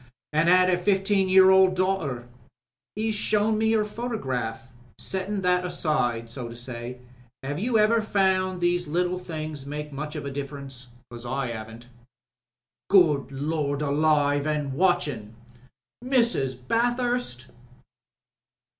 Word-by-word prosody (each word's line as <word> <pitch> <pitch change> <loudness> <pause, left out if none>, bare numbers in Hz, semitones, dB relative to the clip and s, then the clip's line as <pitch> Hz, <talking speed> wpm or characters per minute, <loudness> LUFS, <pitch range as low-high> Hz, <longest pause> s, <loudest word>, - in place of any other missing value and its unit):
"An* 155 +2 +2
'ad 185 0 +6
a 180 -1 +3
fifteen 195 0 +1
year 190 0 +7
old 190 -1 +5
daughter. 180 -10 -1 0.7
'E's 220 +1 -1
shown 215 +1 +1
me 220 0 +2
her 215 -1 +2
photograph. 130 - -4 0.3
Settin' 195 +1 -3
that 180 -1 +2
aside, 150 -10 -1
so 120 +1 -6
to 115 - -9
say, 120 0 -7 0.5
'ave 145 +5 -3
you 235 +1 +1
ever 220 +2 +4
found 190 -3 +1
these 175 0 +1
little 180 +3 0
things 155 -5 -6
make 150 0 -6
much 150 +2 -5 0.2
difference? 140 -2 -7 0.2
Because 120 -1 -10
I 130 -1 -2
haven't." 110 +1 -8 1.0
"Good 155 -8 +4
Lord 145 +1 -2
Alive 145 0 +2
an' 150 -2 -1
WatchinM... 145 - 0 0.7
Mrs. 235 - +1
Bathurst. 240 - 0
160 Hz, 120 wpm, -25 LUFS, 135-190 Hz, 1.0 s, year